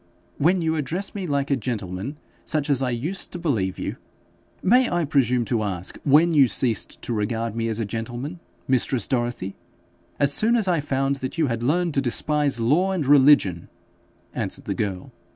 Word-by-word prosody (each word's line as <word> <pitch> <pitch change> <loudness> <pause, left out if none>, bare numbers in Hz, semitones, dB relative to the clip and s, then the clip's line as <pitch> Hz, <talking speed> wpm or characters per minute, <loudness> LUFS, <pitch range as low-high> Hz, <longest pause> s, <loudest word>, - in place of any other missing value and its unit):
'When 175 +4 +3
you 160 0 +1
address 170 +7 -3
me 195 -3 -4
like 140 -1 -1
a - - +4
gentleman, 110 +1 -4 0.3
such 150 -2 -1
as 135 -2 +2
I 130 - 0
used 150 +11 -4
to - - -4
believe 110 - -1
you - - -4 0.3
' - - -36
'May 250 +6 +4
I 175 -2 0
presume 125 -4 +2
to 115 -2 0
ask 95 -4 -3
when 155 +4 +5
you 140 -4 +6
ceased 115 +1 -1
to 120 - -3
regard 115 +1 -2
me 115 0 -1
as 110 0 -2
a 115 - -1
gentleman, 120 - -5 0.3
mistress 130 -3 +2
Dorothy?' 120 -6 -2 0.6
'As 140 0 +3
soon 230 +8 +3
as 220 -5 +1
I 175 -3 +2
found 135 -1 -1
that 130 +3 -5
you 160 - +3
had 115 0 -2
learned 165 +6 +1
to 135 - +1
despise 140 +1 0
law 155 +12 +2
and 170 -6 -1
religion,' 135 - +4 0.6
answered - - -4
the - - -1
girl. 95 -4 -4
135 Hz, 190 wpm, -23 LUFS, 115-155 Hz, 0.6 s, you